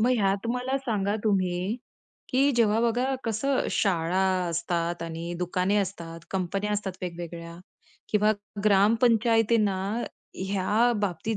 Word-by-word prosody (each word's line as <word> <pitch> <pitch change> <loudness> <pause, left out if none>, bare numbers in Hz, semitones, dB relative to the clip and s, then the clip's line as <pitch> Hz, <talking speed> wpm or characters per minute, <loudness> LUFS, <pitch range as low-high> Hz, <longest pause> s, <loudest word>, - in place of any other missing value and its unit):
मग 240 +3 +3
ह्यात 200 0 +1
मला 250 +2 -1
सांगा 210 -6 -1
तुम्ही, 185 0 0 0.5
की 270 +2 +3
जेव्हा 220 -2 +3
बघा, 245 +3 +1
कसं 250 +4 0
शाळा 180 -2 +1 0.3
असतात 170 0 -2
आणि 165 +1 -5
दुकाने 180 +3 0
असतात, 170 -4 -3
कंपन्या 195 +2 -1
असतात 205 -2 -2
वेगवेगळ्या 170 -1 -6 0.5
किंवा 210 0 +3 0.3
ग्रामपंचायतींना 225 0 +3 0.7
या 210 +5 +2
बाबतीत 205 +3 -1
200 Hz, 110 wpm, -27 LUFS, 180-225 Hz, 0.7 s, मग